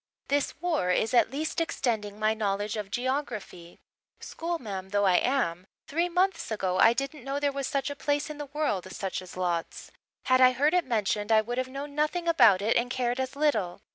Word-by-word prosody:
"This 285 0 0
war 320 - 0
is 215 +6 +1
at 240 - +4
least 305 +5 -2
extending 220 -10 -2
my 215 0 +2
knowledge 205 -1 -2
of 210 -2 -5
geography. 240 -8 -4 0.4
Schoolma'am 220 - -5
though 205 0 +1
I 185 -2 +5
am, 190 -9 0 0.2
three 340 +4 0
months 360 0 0
ago 190 -4 -1
I 225 - +7
didn't 275 +2 -4
know 275 +2 -2
there 285 -1 +1
was 275 -1 -3
such 280 0 -1
a - - -5
place 290 0 -1
in 305 -1 -8
the 295 - -5
world 210 - -2
such 190 -1 -4
as 185 0 -11
Lodz. 175 -2 -3 0.3
Had 255 0 +3
I 255 0 +7
heard 290 +5 +2
it 360 -1 +2
mentioned 210 -1 0
I 220 -1 +6
would 240 +3 -3
have 255 - -1
known 280 +2 -7
nothing 305 +4 -1
about 235 - +5
it 225 - +2
and 240 +1 0
cared 250 -1 -1
as 260 +1 -3
little. 225 -12 0
250 Hz, 200 wpm, -28 LUFS, 205-290 Hz, 0.4 s, I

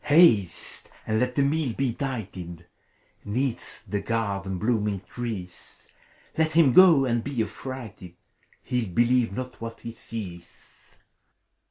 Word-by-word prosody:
Haste, 145 - +3 0.2
and 110 0 +1
let 125 +1 0
the 140 - +3
meal 140 -3 0
be 135 +1 0
dighted 95 -10 -5 0.6
'Neath 125 +4 -3
the 105 - -2
garden's 100 -3 -2
blooming 105 -3 0
trees! 100 -7 -7 0.5
Let 160 0 +1
him 155 -6 +5
go, 170 -6 +8
and 120 -2 0
be 135 -5 -1
affrighted 110 -7 -8
I - - -36 0.5
He'll 125 -5 -1
believe 120 +4 +3
not 125 +4 -6
what 115 0 -7
he 115 - -6
sees. 95 -7 -10
115 Hz, 130 wpm, -26 LUFS, 100-130 Hz, 0.6 s, go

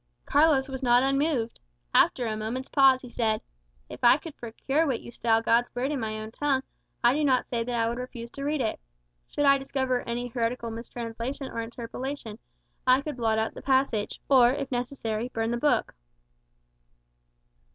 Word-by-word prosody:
Carlos 290 -2 +4
was 265 -1 -6
not 245 -1 +4
unmoved. 275 -3 0 0.3
After 245 - +4
a 220 -1 -1
moment's 225 +5 -4
pause 270 -2 +5
he 250 - -9
said, 220 -3 0 0.5
"If - - -11
I 240 - +7
could 310 -1 -10
procure 270 +7 -1
what 255 -5 0
you - - -10
style 225 -1 +1
God's 235 +2 +3
Word 255 +4 -1
in 290 - -1
my 215 -2 -3
own 215 0 -7
tongue, 270 +1 0 0.4
I 240 +1 +6
do 300 +2 0
not 260 -3 +3
say 235 -2 -2
that 245 +1 -3
I 225 - +2
would 235 +2 -3
refuse 240 -2 -7
to 275 - -7
read 295 0 0
it. 220 - -1 0.5
Should 290 - -1
I 275 0 +6
discover 260 -2 -1
any 240 +1 -2
heretical 235 0 -2
mistranslation 235 +3 -5
or 230 - -3
interpolation, 235 0 -6 0.5
I 255 +2 +5
could 290 -2 -5
blot 225 -2 +1
out 220 0 -1
the - - -9
passage; 260 -6 +1
or, 255 -3 +6
if 275 0 -4
necessary, 245 -2 -2
burn 225 -2 -2
the 240 - 0
book." 290 +4 +1
245 Hz, 185 wpm, -27 LUFS, 230-270 Hz, 0.5 s, I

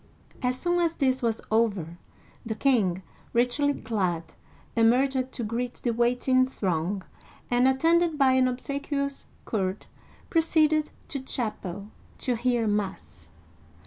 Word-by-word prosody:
As 250 -1 0
soon 350 0 +1
as 335 -1 +1
this 260 -2 +1
was 230 -2 0
over, 200 -7 +1 0.4
the 225 -2 -3
king, 205 -9 +2 0.3
richly 250 +4 +2
clad, 185 -7 -2 0.4
emerged 255 +3 +3
to 240 - -5
greet 235 +3 -3
the 240 - -1
waiting 250 +2 +2
throng, 185 -4 -2 0.5
and, 245 +1 +4
attended 325 +4 +3
by 270 -2 +5
an 260 0 +4
obsequious 280 +2 -3 0.2
court, 190 -2 -2 0.4
proceeded 310 -2 +3 0.2
to 280 - -3
chapel 210 -6 -4 0.3
to 250 - -1
hear 240 0 +1
mass. 205 -2 -3
245 Hz, 120 wpm, -27 LUFS, 215-275 Hz, 0.5 s, by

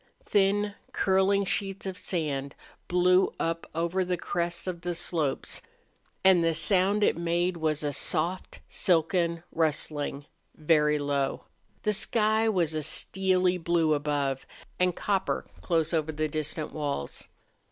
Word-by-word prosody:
Thin, 205 +1 +2 0.2
curling 195 +1 +2
sheets 195 0 -1
of 190 -1 -3
sand 145 -7 -3 0.3
blew 180 +1 +4
up 165 0 -2
over 170 +3 0
the 180 0 -1
crests 170 0 -2
of 180 -2 -4
the 175 0 -3
slopes, 165 -4 -1 0.6
and 185 -3 +6
the 165 -1 +2
sound 195 +4 +2
it - - +3
made 170 +1 0
was 155 -2 -1
a 145 -1 -1
soft, 175 +6 -1
silken 170 -1 +1
rustling, 150 -3 -1 0.3
very 150 -1 +3
low. 140 -1 -1 0.4
The 210 - +2
sky 220 +1 +2
was 175 -7 +1
a 155 - -1
steely 185 +3 +1
blue 165 -2 +2
above 145 -2 -1 0.3
and 180 -1 +2
copper 195 -2 -1 0.2
close 165 -2 0
over 155 -1 0
the 155 0 -1
distant 155 0 -3
walls. 145 - -4
170 Hz, 130 wpm, -28 LUFS, 155-185 Hz, 0.6 s, and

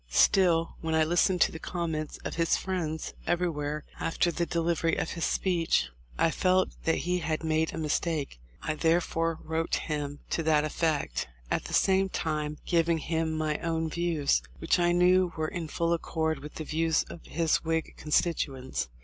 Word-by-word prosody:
Still, 165 - +3
when 160 -1 -1
I 160 - +4
listened 175 +2 +2
to - - +5
the 160 - -7
comments 160 -3 -3
of - - -3
his 165 0 +2
friends 165 -4 -3
everywhere 150 -4 -1 0.2
after 170 +1 +1
the 170 +1 -1
de 170 - -1
livery 165 0 +1
of - - -2
his 170 - -2
speech, 165 - +1 0.3
I 165 - +3
felt 185 +2 +2 0.2
that 165 - +3
he 180 0 +1
had 160 -1 -2
made 160 0 +1
a - - -6
mis 155 -2 +1
take. 155 - -3 0.2
I 155 - 0
therefore 165 0 +1
wrote 160 +1 -1
him 145 -2 -3
to - - +1
that 155 -2 +3
effect, 155 - -1 0.2
at - - 0
the - - -2
same 190 0 +3
time 150 -3 -2
giving 170 -1 +2
him 160 0 -1
my 155 -1 -1
own 165 -1 -1
views, 170 -4 +1 0.2
which 165 - +1
I 175 0 +3
knew 180 +1 +4
were 155 0 -1
in 170 -2 -4
full 170 +2 0
accord 160 -2 -1
with 150 +2 -10
the 155 - -4
views 160 +1 +1
of 170 - -11
his 165 -1 +2
Whig 160 0 -2
con 155 - -10
stituents. 135 - 0
165 Hz, 185 wpm, -29 LUFS, 155-170 Hz, 0.3 s, to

